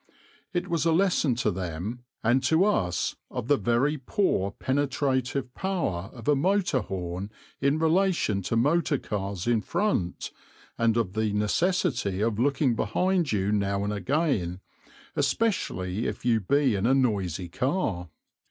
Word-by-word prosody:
It 180 0 -2
was 170 -4 0
a 165 - +4
lesson 170 -7 +2
to 115 -2 0
them 95 +6 -5 0.2
and 120 +4 +3
to 160 +7 +4
us 100 - 0
of - - -5
the 145 - +5
very 130 +7 +1
poor 130 - 0
penetrative 130 0 -1
power 150 - -2
of 115 -3 -11
a 150 - +5
motor 180 -1 +2
horn 90 -1 -4 0.3
in 140 +2 +2
relation 165 - +2
to - - 0
motor 145 +5 +2
cars 100 -5 -4
in 120 -2 +2
front, 105 - -1 0.4
and 115 -1 +2
of 105 -6 0
the 110 -1 0
necessity 120 - 0
of 110 0 0
looking 140 0 +2
behind 175 - +1
you 100 -1 +1
now 100 -1 0
and 105 +1 -1
again, 105 - 0 0.6
especially 105 - 0
if - - -5
you 115 -2 +3
be 135 +5 +2
in 100 +2 0
a 135 - +4
noisy 95 -9 0
car. 105 - -1
120 Hz, 145 wpm, -27 LUFS, 100-150 Hz, 0.6 s, the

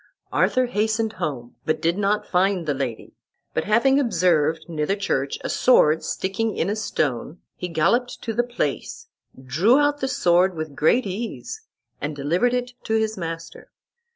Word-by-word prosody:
Arthur 255 0 +2
hastened 220 -1 0
home, 120 -5 -4
but 155 - 0
did 165 +1 +1
not 205 +1 0
find 185 -1 +1
the 150 - 0
lady; 130 -5 -4 0.4
but 160 - -1
having 250 +6 +4
observed 165 - +2
near 155 -3 -2
the 195 - +1
church 140 -9 -1
a - - -2
sword, 160 -11 +4
sticking 205 +3 -2
in 190 - 0
a - - -1
stone, 155 - -2 0.2
he 180 - -5
galloped 205 +10 +1
to 225 - -2
the 235 - +2
place, 345 - -4 0.3
drew 160 - +3
out 290 0 +2
the 265 - -1
sword 180 -6 +3
with 155 -3 -5
great 215 - +3
ease, 195 - -5 0.4
and 145 +1 -3
delivered 175 - +1
it 245 0 -3
to 220 - 0
his 220 0 0
master. 165 -3 -7
190 Hz, 165 wpm, -23 LUFS, 155-230 Hz, 0.4 s, having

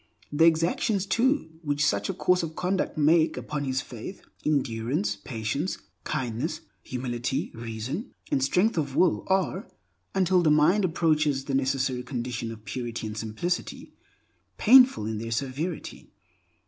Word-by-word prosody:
The 155 +2 +4
exactions, 170 +5 +2
too, 230 - 0
which 145 -2 0
such 100 -4 +1
a - - 0
course 180 0 +2
of 160 -1 -5
conduct 185 -1 -1
make 160 +2 +4
upon 150 -1 -3
his 130 0 0
faith, 125 - -9 0.2
endurance, 120 -6 0
patience, 115 - -3 0.3
kindness, 130 +6 -2 0.2
humility, 125 0 -3
reason, 115 - -5 0.2
and 135 - +2
strength 180 +8 +2
of 140 -3 -3
will, 180 -3 +3
are, 190 0 0 0.5
until 185 -1 +3
the 160 - +3
mind 160 +7 +4
approaches 155 -5 +1
the 140 - -3
necessary 135 -1 0
condition 120 -2 -4
of 110 -1 -11
purity 120 -3 -4
and 105 -1 -5
simplicity, 110 +12 -3 0.6
painful 250 - +6
in 110 -1 -3
their 115 +1 -5
severity. 140 +8 -4
145 Hz, 135 wpm, -27 LUFS, 120-170 Hz, 0.6 s, painful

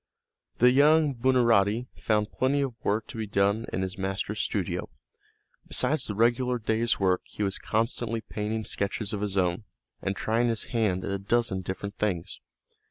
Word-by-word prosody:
The 125 +1 +6
young 150 +2 +5
Buonarotti 120 -3 +3
found 105 -1 0
plenty 140 +2 +1
of 135 -3 -1
work 105 +2 0
to - - -8
be 110 - -3
done 100 +3 +1
in 95 - -1
his 95 0 -5
master's 95 +1 -2
studio. - - -2 0.8
Besides 140 +5 +1
the 105 - -3
regular 120 +3 +2
day's 115 +1 0
work 95 -2 +2
he 105 - -5
was 95 -1 -1
constantly 115 0 -1
painting 110 0 -3
sketches 100 +1 -2
of 100 - -3
his 100 -2 -2
own, 90 +2 +1 0.4
and 95 0 -2
trying 115 +4 +1
his 115 -2 0
hand 105 -6 +1
at - - -3
a 100 - -2
dozen 100 -1 0
different 100 +3 -5
things. 90 -6 -2
110 Hz, 165 wpm, -27 LUFS, 100-120 Hz, 0.8 s, The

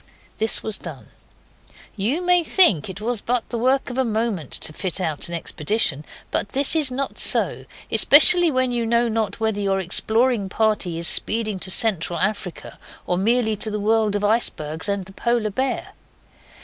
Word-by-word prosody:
This 220 0 +2
was 220 -1 -3
done. - - -10 0.9
You 240 - -2
may 355 -1 +2
think 300 - +2
it 190 0 -8 0.3
but 245 0 -1
the 235 - -4
work 260 +2 0
of 250 - -4
a - - +2
moment 220 - -3
to 155 - -5
fit 185 +3 -3
out 160 -5 -3
an 170 - -5
expedition, 155 -2 -2 0.3
but - - -1
this 275 +4 +4
is 305 -4 +2
not 265 +2 -4
so, - - +2 0.3
especially 350 +4 +6
when 255 -3 0
you 240 -1 -2
know 235 +1 +1
not 220 -2 -3
whether 220 -2 -2
your 195 -1 0
exploring 220 +4 0
party 210 -5 -1
is 170 0 +2
speeding 215 0 +2
to 185 - -5
Central 185 -4 +2
Africa 195 -2 -4 0.3
or 180 - -1
merely 220 +3 +1
to 215 - -2
the 210 0 -4
world 215 0 0
of 205 - -3
icebergs 180 -6 -1
and 200 -2 -3
the 195 - -14
Polar 235 -1 -1
bear. 260 +5 -3
220 Hz, 175 wpm, -21 LUFS, 195-245 Hz, 0.9 s, especially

